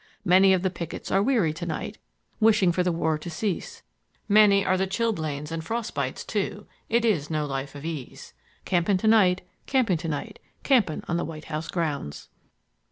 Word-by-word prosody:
Many 190 +2 +6
of 185 -1 +1
the 190 - +1
pickets 170 -2 -6
are 195 - +3
weary 210 - +2
to 170 +3 -6
night, 205 +6 -4 0.4
Wishing 215 -5 +4
for 180 - 0
the 180 0 +1
war 160 -2 0
to 175 - -7
cease; 185 +3 -4 0.4
many 200 -1 +5
are 185 - +3
the 190 +1 0
chilblains 160 -9 -2
and 165 -1 -3
frost 230 +6 -3
bites - - -3
too; - - -3 0.2
It 235 +1 +2
is 160 -10 +1
no 155 -2 -1
life 135 0 -4
of 145 +2 -8
ease. 155 -6 -7 0.3
Camping 185 +2 +2
to 220 - -1
night, 190 -5 +5 0.3
camping 240 -10 +2
to 165 +1 -6
night, 150 -3 -4 0.2
Camping 230 - +2
on 170 - 0
the 175 - -1
White 155 -1 -8
House 155 +2 -3
grounds." 150 - -3
180 Hz, 185 wpm, -26 LUFS, 160-205 Hz, 0.4 s, Many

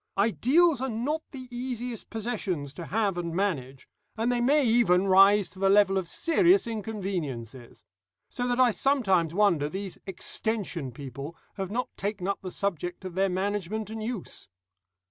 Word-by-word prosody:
Ideals 260 - +3
are 265 - -1
not 260 +8 -2
the 260 -2 -9
easiest 245 -2 -4
possessions 200 - -3
to 170 0 -8
have 200 -4 0
and 170 -1 -4
manage, 140 -10 -2 0.3
and 230 +2 +1
they 245 -1 0
may 280 +3 +4
even 220 -6 +4
rise 195 +1 +6
to 185 - -12
the 195 0 +3
level 200 -1 +5
of 185 -3 -1
serious 350 - +3
inconveniences. 170 - -5 0.4
So 245 0 -3
that 245 0 0
I 250 -2 +6
sometimes 190 - +2
wonder 175 -8 +3
these 190 +2 -6
Extension 190 - -2
people 140 +4 -8 0.2
have 190 -2 -4
not 245 +5 -3
taken 200 -2 -3
up 200 - -1
the 185 - -5
subject 180 -1 -3
of 185 - -5
their 190 +2 +1
management 205 +2 -2
and 220 0 -5
use. 220 - -5
200 Hz, 160 wpm, -27 LUFS, 175-235 Hz, 0.4 s, rise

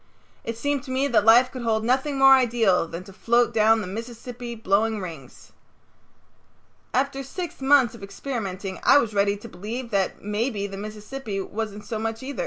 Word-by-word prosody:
It 230 0 -5
seemed 285 +3 -1
to - - -11
me 260 +2 +1
that 215 -4 +3
life 240 +3 +6
could 255 - -7
hold 220 -2 0
nothing 265 +4 +1
more 270 0 +8
ideal 230 -9 +3
than 170 +2 -7
to 195 +1 -14
float 235 +4 +2
down 220 0 +4
the - - -4
Mississippi 235 +3 -7
blowing 220 +1 +1
rings. 160 -9 -10 1.4
After 275 +1 0
six 320 +4 -6
months 265 -4 +4
of 235 - -12
experimenting 195 -3 -5
I - - +6
was 230 -6 +1
ready 200 0 +2
to 210 - -11
believe 230 +5 -6
that 195 -2 -1
maybe 210 +1 -2
the 195 -1 -6
Mississippi 210 +2 -6
wasn't 210 +1 -5
so 220 -3 -4
much 225 +2 -3
either. 280 +2 -6
225 Hz, 180 wpm, -24 LUFS, 205-255 Hz, 1.4 s, more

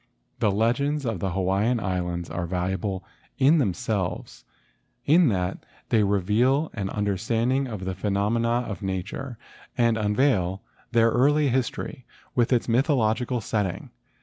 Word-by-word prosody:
The 110 - +3
legends 125 +8 +1
of 110 -6 -2
the 95 0 -2
Hawaiian 95 +6 +1
Islands 90 -3 -2
are 85 -1 -3
valu¬ 90 +1 -1
able 95 0 -3 0.3
in 145 +5 +5
themselves, 95 - -2 0.6
in 165 +3 +5
that 95 -4 -1 0.3
they 110 - +3
reveal 105 - +2
an 100 -4 -3
under¬ 100 -1 -1
standing 120 +5 0
of 105 -6 -6
the 95 - -2
phenomena 110 +5 0
of 105 0 -6
nature 100 +7 -4 0.4
and 115 -2 +3
unveil 105 -4 +1 0.3
their 115 -1 +4
early 145 +4 +3
history 125 0 -3 0.3
with 120 -2 +1
its 120 -2 +2
mythological 125 -1 +1
setting. 105 -5 -2
110 Hz, 135 wpm, -25 LUFS, 95-125 Hz, 0.6 s, in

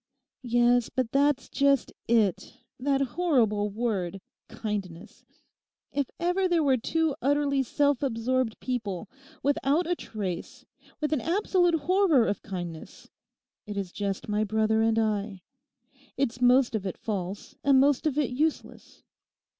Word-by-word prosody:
'Yes, 240 -1 +2
but 255 -3 -2
that's 280 -1 +2
just 280 -1 +1
it—that 235 +5 0
horrible 240 - +1
word 200 -4 -2 0.3
"kindness"! 210 -4 -6 0.7
If 280 -2 -1
ever 360 +2 +1
there 345 -3 +2
were 270 -3 +3
two 320 +5 0
utterly 280 0 +2
self 285 +1 +1
absorbed 255 -2 -1
people, 215 -7 -3 0.4
without 285 +4 +1
a 350 +2 0
trace, 200 - -6 0.4
with 300 0 0
an 290 - 0
absolute 355 -1 +2
horror 355 - +3
of 205 - -2
kindness, 175 -5 -8 0.6
it 205 -1 -5
is 195 -3 -3
just 200 -1 -3
my 210 0 0
brother 220 +1 +1
and 225 0 +2
I. 210 -4 -1 0.7
It's 250 -2 -1
most 250 0 +4
of 205 -3 -2
it 185 - -5
false 195 -2 -5
and 275 -1 +5
most 285 +2 +3
of 295 -2 -1
it 290 -4 +1
useless. 305 +5 -3
245 Hz, 130 wpm, -27 LUFS, 210-285 Hz, 0.7 s, and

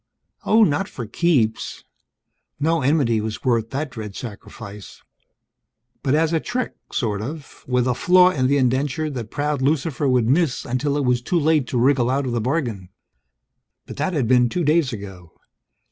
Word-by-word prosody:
Oh, 220 +1 +6
not 195 +3 +1
for 120 - -6
keeps! 120 -3 0 0.8
No 160 +2 +1
enmity 130 -5 +2
was 110 0 -5
worth 115 -3 +1
that 140 +2 -3
dread 110 -4 -7
sacrifice. 105 -2 -9 1.0
But 135 0 +1
as 160 +1 +1
a 165 - +2
trick, 250 +8 -3 0.2
sort 105 -6 -1
of 145 +5 -8
with 125 0 +1
a 125 - +2
flaw 180 +6 +5
in 130 -6 0
the 140 +2 +2
indenture 135 +4 0
that 120 -5 -6
proud 145 0 -2
Lucifer 145 0 0
would 125 -3 +2
miss 145 +1 +1
until 140 +4 -1
it 145 - 0
was 125 -1 +2
too 170 +8 0
late 155 -4 +2
to 125 - -2
wriggle 125 0 +3
out 135 +2 0
of 125 - -2
the 120 -1 -1
bargain. 120 - -2 1.0
But - - -10
that 155 +6 -1
had 140 -8 0
been 125 0 +4
two 175 +8 -1
days 150 -2 +2
ago. 95 -6 -9
130 Hz, 175 wpm, -22 LUFS, 120-155 Hz, 1.0 s, Oh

